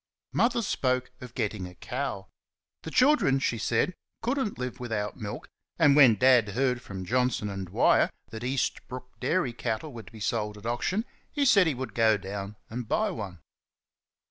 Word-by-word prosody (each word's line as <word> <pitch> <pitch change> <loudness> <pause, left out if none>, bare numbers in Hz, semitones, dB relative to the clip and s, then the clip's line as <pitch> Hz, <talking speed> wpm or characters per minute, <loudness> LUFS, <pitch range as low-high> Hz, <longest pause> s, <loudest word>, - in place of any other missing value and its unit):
Mother 235 0 +2
spoke 130 - 0
of 125 -2 -10
getting 100 -3 -2
a 90 - -13
cow. 110 -4 -4 0.5
The - - -6
children, 255 - +4
she 120 -4 -1
said, 180 - +1 0.3
could 250 +5 0
n't 220 -6 -2
live 125 -1 -4
without 110 -4 -3
milk 105 -5 -6 0.3
and 140 -1 +5
when 130 -6 +8
Dad 125 -3 +5
heard 125 +3 0
from 95 -5 -7
Johnson 125 -1 +1
and 95 -1 -5
Dwyer 85 - +4 0.2
that 110 -1 -6
Eastbrook 125 0 -2
dairy 130 -1 0
cattle 120 +5 -3
were 115 - -7
to - - -15
be 110 - -11
sold 105 0 -1
at 105 - -13
auction, 175 - -1 0.3
he 290 -2 +1
said 200 -8 +6
he 150 - +1
would 130 +1 -5
go 110 -2 +4
down 100 +1 -6
and 120 0 -5
buy 215 - +1
one. 95 - -6
125 Hz, 175 wpm, -28 LUFS, 105-140 Hz, 0.5 s, when